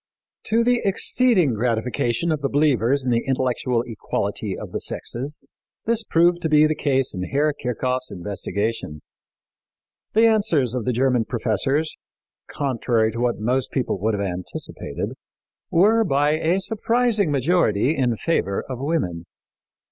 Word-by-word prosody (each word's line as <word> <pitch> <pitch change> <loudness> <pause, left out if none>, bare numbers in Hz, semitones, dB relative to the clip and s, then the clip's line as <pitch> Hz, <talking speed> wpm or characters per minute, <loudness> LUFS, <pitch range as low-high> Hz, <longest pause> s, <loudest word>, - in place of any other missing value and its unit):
To 230 +1 +2
the 245 0 +2
exceeding 195 - +3
gratification 120 +5 0
of 155 -2 -1
the 140 - 0
believers 140 -2 +2
in 125 - +1
the 115 0 +1
intellectual 125 -2 0
equality 115 -3 -3
of - - -8
the - - -3
sexes, 135 +6 -5 0.5
this 230 0 +1
proved 175 -2 +3
to 160 - -1
be 150 0 +6
the 155 - +2
case 135 -4 0
in 90 -1 -3
Herr 145 +5 +1
Kirchhoff's 130 -1 -2
investigation. 100 -3 -4 1.1
The 225 +2 +5
answers 200 - +2
of 125 -3 -3
the 125 - +1
German 125 -1 +1
professors, 135 +7 -1 0.5
contrary 120 -5 0
to 115 - -6
what 120 0 0
most 125 +4 0
people 125 -7 -2
would 110 +2 0
have 100 0 -2
anticipated, 90 -1 -4 0.6
were, 215 +6 +4
by 145 -5 +2
a 160 +4 +1
surprising 220 -1 +1
majority, 145 - +2
in 125 -5 0
favor 100 - -1
of 130 -2 -5
women. 130 - -2
135 Hz, 140 wpm, -22 LUFS, 115-165 Hz, 1.1 s, be